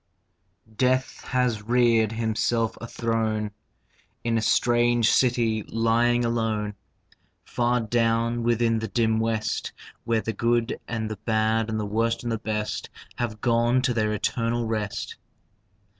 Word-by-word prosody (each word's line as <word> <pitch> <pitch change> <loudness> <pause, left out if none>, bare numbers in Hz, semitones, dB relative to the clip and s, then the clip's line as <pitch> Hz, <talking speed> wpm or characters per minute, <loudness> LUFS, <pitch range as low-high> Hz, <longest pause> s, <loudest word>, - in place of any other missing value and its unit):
Death 130 0 0
has 125 -4 0
reared 115 -1 +3
himself 115 0 0
a 115 - -6
throne 110 -2 -1 0.7
In 115 -1 0
a 115 - +1
strange 120 0 +3
city 115 -3 +2
lying 115 +3 +1
alone 110 -3 -1 0.7
Far 120 0 0
down 115 +1 +1
within 115 -1 +2
the 110 - -3
dim 110 +2 +1
West, 110 -1 -1 0.3
Where 115 -1 +1
the 115 - -3
good 120 +2 0
and 115 -2 -3
the 110 - -5
bad 110 +1 0
and 110 -1 -1
the 105 - -2
worst 115 +3 0
and 120 - -2
the 115 - -1
best 105 -1 -3 0.3
Have 110 -3 -3
gone 120 +2 +2
to 130 -1 +1
their 110 -2 0
eternal 115 +2 -1
rest. 110 -2 -3
115 Hz, 135 wpm, -25 LUFS, 110-120 Hz, 0.7 s, reared